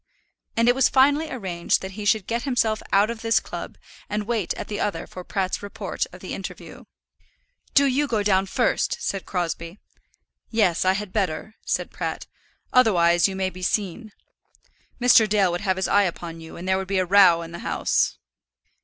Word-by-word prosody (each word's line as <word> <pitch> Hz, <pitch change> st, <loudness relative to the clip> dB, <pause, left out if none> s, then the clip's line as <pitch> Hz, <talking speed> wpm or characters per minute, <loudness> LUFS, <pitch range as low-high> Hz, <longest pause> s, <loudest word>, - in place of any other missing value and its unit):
And 230 Hz, +1 st, +3 dB
it 245 Hz, -, +6 dB
was 260 Hz, 0 st, +3 dB
finally 285 Hz, +4 st, +3 dB
arranged 185 Hz, -9 st, -1 dB
that 190 Hz, -, -5 dB
he 205 Hz, +2 st, -7 dB
should 210 Hz, -2 st, +2 dB
get 235 Hz, +2 st, -2 dB
himself 230 Hz, -5 st, 0 dB
out 205 Hz, +3 st, +4 dB
of 230 Hz, -1 st, -7 dB
this 225 Hz, 0 st, +3 dB
club -, -, -8 dB, 0.3 s
and 210 Hz, 0 st, -2 dB
wait 220 Hz, -5 st, -1 dB
at -, -, -6 dB
the 205 Hz, -, -4 dB
other 205 Hz, -, -2 dB
for 180 Hz, -, -9 dB
Pratt's 190 Hz, 0 st, -2 dB
report 205 Hz, 0 st, -4 dB
of -, -, -13 dB
the -, -, -6 dB
interview. -, -, -8 dB, 0.9 s
"Do 280 Hz, -, +6 dB
you 280 Hz, +2 st, +1 dB
go 220 Hz, -5 st, 0 dB
down 195 Hz, -1 st, +2 dB
first," -, -, 0 dB
said 195 Hz, -, -3 dB
Crosbie. 170 Hz, 0 st, -3 dB, 0.7 s
"Yes: 200 Hz, -7 st, +2 dB
I 185 Hz, -, +4 dB
had 195 Hz, -1 st, -5 dB
better," 200 Hz, +1 st, -2 dB
said -, -, -1 dB
Pratt. -, -, -4 dB, 0.5 s
"Otherwise 175 Hz, -8 st, +4 dB
you 195 Hz, -, -5 dB
may 190 Hz, 0 st, -1 dB
be 185 Hz, -, -11 dB
seen. 210 Hz, +3 st, -2 dB, 0.9 s
Mr. 240 Hz, -3 st, +5 dB
Dale 200 Hz, -3 st, +3 dB
would 175 Hz, -, -3 dB
have 190 Hz, -2 st, 0 dB
his 190 Hz, -, 0 dB
eye 200 Hz, 0 st, +4 dB
upon 170 Hz, -2 st, -5 dB
you, 160 Hz, -, -11 dB
and 175 Hz, +2 st, -7 dB
there 190 Hz, 0 st, +2 dB
would 190 Hz, -, -5 dB
be 195 Hz, 0 st, -1 dB
a 185 Hz, -, +2 dB
row 180 Hz, -3 st, +6 dB
in 165 Hz, -, -9 dB
the 170 Hz, -, -7 dB
house." -, -, 0 dB
200 Hz, 190 wpm, -24 LUFS, 185-225 Hz, 0.9 s, it